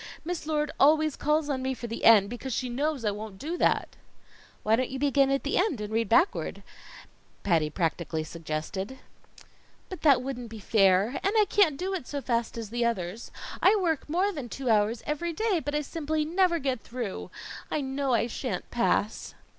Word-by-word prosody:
Miss 340 Hz, -2 st, -4 dB
Lord 300 Hz, -1 st, 0 dB
always 310 Hz, +1 st, +4 dB
calls 300 Hz, +1 st, +1 dB
on 275 Hz, -3 st, -1 dB
me 260 Hz, 0 st, -1 dB
for 240 Hz, -, -7 dB
the 230 Hz, 0 st, -4 dB
end, 210 Hz, -3 st, +7 dB
because 245 Hz, +3 st, -5 dB
she 255 Hz, -, -2 dB
knows 280 Hz, 0 st, -1 dB
I 210 Hz, -, +2 dB
won't 205 Hz, -1 st, -7 dB
know 325 Hz, +4 st, -2 dB
that." -, -, +2 dB, 0.8 s
"Why 215 Hz, +1 st, +4 dB
don't 255 Hz, +2 st, -1 dB
you 265 Hz, -, -4 dB
begin 275 Hz, 0 st, +3 dB
at 275 Hz, 0 st, 0 dB
the 285 Hz, -, 0 dB
end 365 Hz, -, +1 dB
and 210 Hz, +1 st, -5 dB
read 225 Hz, -2 st, 0 dB
backwards?" 325 Hz, -, +2 dB, 0.8 s
Patty 165 Hz, -5 st, +2 dB
practically 165 Hz, -1 st, -2 dB
suggested. 165 Hz, +8 st, -5 dB, 0.9 s
"But 370 Hz, -4 st, -7 dB
that 275 Hz, -5 st, +5 dB
wouldn't 250 Hz, -3 st, -5 dB
be 225 Hz, -, -8 dB
fair, 200 Hz, +3 st, +3 dB
and 395 Hz, -, +1 dB
I 425 Hz, -, +6 dB
can't 350 Hz, -9 st, +3 dB
do 375 Hz, +4 st, -2 dB
it 350 Hz, -10 st, -4 dB
so 285 Hz, -, -3 dB
fast 235 Hz, -4 st, -1 dB
as 220 Hz, -2 st, -6 dB
the 240 Hz, 0 st, 0 dB
others. 215 Hz, -2 st, -2 dB, 0.3 s
I 400 Hz, -, +6 dB
work 330 Hz, -8 st, 0 dB
more 370 Hz, +6 st, +1 dB
than 285 Hz, -10 st, -6 dB
two 260 Hz, -1 st, -1 dB
hours 215 Hz, +2 st, +2 dB
every 330 Hz, +3 st, -2 dB
day, 425 Hz, -1 st, +1 dB
but 290 Hz, -1 st, -3 dB
I 300 Hz, -, +1 dB
simply 310 Hz, 0 st, -2 dB
never 350 Hz, +1 st, +2 dB
get 265 Hz, -6 st, -2 dB
through. 235 Hz, -4 st, -5 dB, 0.4 s
I 305 Hz, -, -1 dB
know 270 Hz, -1 st, 0 dB
I 230 Hz, -, +2 dB
shan't 245 Hz, +2 st, -4 dB
pass." 230 Hz, -3 st, 0 dB
265 Hz, 195 wpm, -28 LUFS, 220-305 Hz, 0.9 s, end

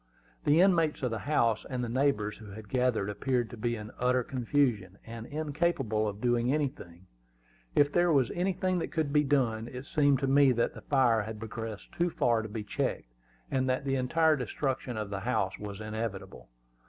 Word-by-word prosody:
The 150 Hz, +4 st, +5 dB
inmates 165 Hz, -7 st, +3 dB
of 125 Hz, -, 0 dB
the 110 Hz, -, -2 dB
house 115 Hz, -7 st, +2 dB
and 125 Hz, -2 st, -2 dB
the -, -, -2 dB
neighbors 115 Hz, -4 st, 0 dB
who 110 Hz, -2 st, -11 dB
had 105 Hz, +1 st, -10 dB
gathered 125 Hz, -5 st, +1 dB
appeared 120 Hz, +3 st, -1 dB
to -, -, -7 dB
be 120 Hz, +2 st, -1 dB
in 105 Hz, -1 st, -8 dB
utter 125 Hz, 0 st, +2 dB
confusion, 120 Hz, -7 st, 0 dB
and 115 Hz, 0 st, -8 dB
incapable 145 Hz, -7 st, -1 dB
of 100 Hz, 0 st, -5 dB
doing 120 Hz, +1 st, +1 dB
anything, 130 Hz, -, -3 dB, 0.7 s
if 145 Hz, 0 st, +4 dB
there 175 Hz, 0 st, +3 dB
was 135 Hz, -6 st, +3 dB
anything 185 Hz, 0 st, 0 dB
that -, -, -4 dB
could 155 Hz, -3 st, -1 dB
be 150 Hz, 0 st, +4 dB
done. 120 Hz, -6 st, +1 dB
It 125 Hz, +2 st, -8 dB
seemed 145 Hz, -2 st, +3 dB
to 135 Hz, -, +1 dB
me 135 Hz, -1 st, +5 dB
that 120 Hz, 0 st, 0 dB
the -, -, -10 dB
fire 125 Hz, -5 st, +3 dB
had 110 Hz, +1 st, -6 dB
progressed 110 Hz, -1 st, -7 dB
too 175 Hz, +1 st, +1 dB
far 120 Hz, -8 st, +1 dB
to 110 Hz, -, -7 dB
be 105 Hz, +1 st, -5 dB
checked, -, -, -3 dB, 0.4 s
and 130 Hz, -1 st, +1 dB
that 130 Hz, +2 st, 0 dB
the 135 Hz, -, 0 dB
entire 155 Hz, +5 st, +3 dB
destruction 130 Hz, -1 st, -3 dB
of 105 Hz, -2 st, -4 dB
the 100 Hz, -, -2 dB
house 95 Hz, -3 st, -1 dB
was 105 Hz, -1 st, -7 dB
inevitable. 105 Hz, -, -5 dB
125 Hz, 190 wpm, -30 LUFS, 110-140 Hz, 0.7 s, The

